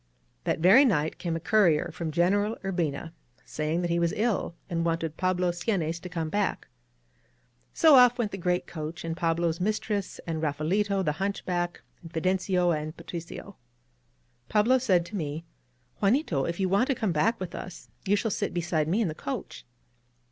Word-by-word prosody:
That - - +1
very 190 - +7
night 160 - +1
came 170 -2 -2
a - - -2
courier 170 -3 +3
from 165 -2 -4
General 200 +7 +1
Ur 195 - -1
bina, 165 -2 -2 0.3
saying 155 +3 -2
that 175 - -1
he 170 - +2
was 170 -1 +1
ill 215 -5 0
and 170 -2 -1
wanted 165 -2 -1
Pablo 185 -1 +1
Seanes 175 -2 -1
to 180 - -8
come 165 -3 -3
back. 205 +4 -1 1.0
So 315 -4 +6
ofF 245 0 +3
went 225 -4 -1
the 195 - -6
great 180 0 0
coach, 155 0 -6
and 165 0 -2
Pa 165 -1 +1
blo's 170 0 -1
mistress, 210 0 -2
and 160 -2 -3
Raphaelito, 190 +7 0
the 150 - +1
hunchback, 180 -3 -2 0.2
and 165 -2 -11
Fi 165 - -2
dencio, 185 -1 +2
and 155 +1 -5
Patricio. 175 +3 -8 0.9
Pablo 235 +5 +4
said 185 -9 +2
to 210 - -8
me: 155 -2 -4 0.6
^^Juanito, 195 - +2
if 170 - -4
you 190 - +2
want 200 +7 +2
to 270 - +1
come 215 -5 -1
back 195 +9 +1
with 185 -2 -5
us, 180 -2 -8 0.2
you 200 - +4
shall 220 +1 -1
sit 205 -1 -2
beside 165 -3 0
me 195 +8 +1
in 215 - +1
the 155 - -3
coach." 140 -4 -6
175 Hz, 185 wpm, -27 LUFS, 165-200 Hz, 1.0 s, very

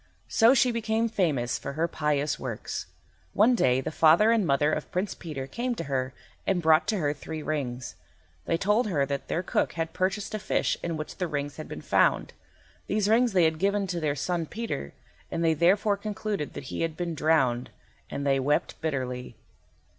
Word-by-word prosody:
So 230 +4 +5
she 250 -1 +4
became 225 0 0
famous 155 - 0
for - - -5
her 160 +3 0
pious 150 -2 0
works. 120 -5 -5 0.5
One 225 +5 +5
day 130 - +3
the - - -4
father 165 +8 +5
and 220 -6 +2
mother 145 +2 +2
of 155 - -3
Prince 185 +3 -1
Peter 150 -6 -6
came 240 - -3
to - - -4
her 130 -2 -2 0.4
and 190 -2 +2
brought 160 -1 +4
to 215 - +1
her 145 -5 0
three 155 +1 -7
rings. 130 -5 -3 0.5
They 165 - +1
told 210 +6 +2
her 150 -8 +1
that 140 0 -4
their 175 - -1
cook - - 0
had 165 -1 -3
purchased 195 +3 -1
a 215 - -2
fish 210 - 0
in 165 -2 -3
which 155 - -6
the 180 - -1
rings 145 -2 -3
had 155 - -7
been 75 - -7
found. - - +2 0.5
These 205 0 +1
rings 235 0 +4
they 180 -2 +4
had 160 -1 +2
given 200 +1 +1
to 175 -2 -3
their 150 -3 0
son 165 +3 -2
Peter, 220 - -4 0.4
and 170 - -2
they 165 -1 +4
therefore 195 +6 +3
concluded 205 -5 -3
that - - -6
he - - -2
had 165 -1 -2
been 175 -1 -2
drowned, 140 -6 +2 0.4
and 140 - -4
they 135 -1 +3
wept 145 +3 0
bitterly. 130 -5 -3
160 Hz, 195 wpm, -27 LUFS, 145-200 Hz, 0.5 s, So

